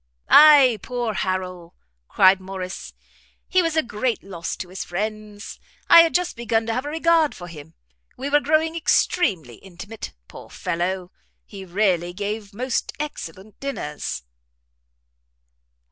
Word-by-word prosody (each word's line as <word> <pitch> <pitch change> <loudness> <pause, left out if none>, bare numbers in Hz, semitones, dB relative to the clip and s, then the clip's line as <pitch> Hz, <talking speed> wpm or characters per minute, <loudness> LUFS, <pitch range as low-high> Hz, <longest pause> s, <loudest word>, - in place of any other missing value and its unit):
"Ay, 285 -7 +8
poor 245 -3 -3
Harrel!" 185 -3 -4 0.3
cried 190 0 +5
Morrice, 185 -1 -7 0.5
"he 370 - +3
was 330 -2 -1
a 315 - +3
great 235 +1 -2
loss 180 -4 -5
to 180 - -8
his 185 - -5
friends. 210 +2 -6 0.3
I 335 - +11
had 330 -1 +1
just 360 0 0
begun 230 -1 -1
to 225 - -2
have 255 +4 -2
a - - -3
regard 325 0 +2
for 175 - -9
him; 160 -2 -12 0.4
we 265 - -4
were 290 +1 +4
growing 315 +2 +1
extremely 190 - +1
intimate. 195 +4 -9
Poor - - -12
fellow! 180 +2 -3 0.3
he 195 -2 -10
really 180 -2 0
gave 205 +2 -5
most 250 +4 -3
excellent 210 - -7
dinners." 150 - -5
210 Hz, 135 wpm, -22 LUFS, 185-275 Hz, 0.5 s, I